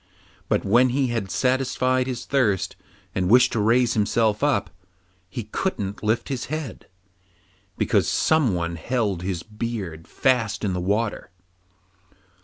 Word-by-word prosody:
But -, -, +1 dB
when 120 Hz, +6 st, +4 dB
he 130 Hz, +1 st, +1 dB
had 115 Hz, -5 st, -2 dB
satisfied 130 Hz, +1 st, +1 dB
his 125 Hz, -3 st, -4 dB
thirst, 105 Hz, -9 st, +1 dB, 0.4 s
and 90 Hz, -1 st, 0 dB
wished 125 Hz, +3 st, +6 dB
to 115 Hz, -, 0 dB
raise 115 Hz, +3 st, +3 dB
himself 110 Hz, +1 st, +1 dB
up, 145 Hz, -9 st, +1 dB, 0.6 s
he 110 Hz, +6 st, -5 dB
couldn't 105 Hz, -, -3 dB
lift 110 Hz, +2 st, 0 dB
his 130 Hz, -3 st, -3 dB
head, 155 Hz, -3 st, -6 dB, 0.9 s
because -, -, +2 dB
someone 90 Hz, -, +1 dB
held 105 Hz, -1 st, -1 dB
his 90 Hz, -2 st, -3 dB
beard 105 Hz, -7 st, -5 dB
fast 115 Hz, -6 st, +1 dB
in 95 Hz, -, 0 dB
the 90 Hz, -, -2 dB
water. 105 Hz, +2 st, -1 dB
115 Hz, 130 wpm, -24 LUFS, 100-125 Hz, 0.9 s, wished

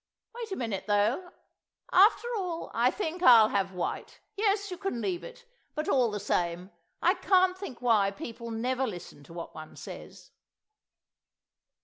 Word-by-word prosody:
Wait 465 Hz, -2 st, -7 dB
a -, -, -1 dB
minute, 220 Hz, -, -3 dB
though; 215 Hz, -, +1 dB, 0.6 s
after 415 Hz, +5 st, +5 dB
all, 360 Hz, -5 st, -4 dB
I 240 Hz, +2 st, +3 dB
think 350 Hz, +1 st, -4 dB
I'll 230 Hz, -9 st, +8 dB
have 195 Hz, -1 st, 0 dB
white.... 180 Hz, -2 st, -4 dB, 0.2 s
Yes, 405 Hz, -1 st, 0 dB
you 360 Hz, -, -5 dB
can 390 Hz, -11 st, -3 dB
leave 350 Hz, +7 st, -2 dB
it; -, -, -11 dB, 0.3 s
but 305 Hz, +1 st, -3 dB
all 250 Hz, -4 st, +3 dB
the 210 Hz, -1 st, -4 dB
same, 175 Hz, +1 st, -1 dB, 0.3 s
I -, -, +5 dB
can't 370 Hz, -1 st, +3 dB
think 280 Hz, -11 st, -9 dB
why 215 Hz, -5 st, +4 dB
people 230 Hz, +4 st, -8 dB
never 250 Hz, +4 st, -1 dB
listen 175 Hz, -7 st, -8 dB
to 165 Hz, -, -13 dB
what 170 Hz, -1 st, -7 dB
one 155 Hz, 0 st, -10 dB
says." -, -, -10 dB
250 Hz, 155 wpm, -29 LUFS, -, 0.6 s, I'll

